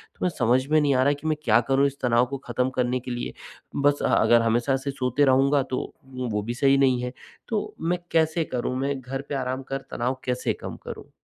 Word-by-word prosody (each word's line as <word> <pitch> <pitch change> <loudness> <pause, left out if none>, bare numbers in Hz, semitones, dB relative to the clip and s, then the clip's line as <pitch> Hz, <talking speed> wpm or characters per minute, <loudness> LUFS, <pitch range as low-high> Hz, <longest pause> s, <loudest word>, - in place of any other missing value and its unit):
तो - - -32
मैं - - +3
समझ 125 -2 +1
में 155 +1 +4
नहीं 145 -2 +2
आ 130 - +4
रहा 145 +1 +3
कि 145 +2 -6
मैं 155 - +2
क्या 115 -1 +5
करूँ 135 +1 +4
इस 140 0 -7
तनाव 120 -1 +3
को 135 +2 -5
खत्म 125 +2 0
करने 125 0 +1
के 125 0 -7
लिए, 120 - -4 0.4
बस 145 0 +2
अ, - - +1
अगर 120 0 +5
हमेशा 120 +4 +2
से 140 +1 -4
सोते 130 +2 +1
रहूँगा 135 +1 +4
तो 130 - -3 0.3
वो 130 -1 -5
वो 105 -1 -1
भी 120 +2 -3
सही 135 +2 +3
नहीं 130 -2 +3
है। 125 +1 -4 0.3
तो 215 -3 -3
मैं 175 +2 0
कैसे 160 0 +2
करूँ? 125 0 -2
मैं 140 0 -1
घर 135 +2 -5
पे 145 - -2
आराम 130 0 -2
कर 135 0 -2
तनाव 125 +2 -2
कैसे 125 0 0
कम - - -6
करूँ? - - -8
130 Hz, 240 wpm, -25 LUFS, 125-140 Hz, 0.4 s, क्या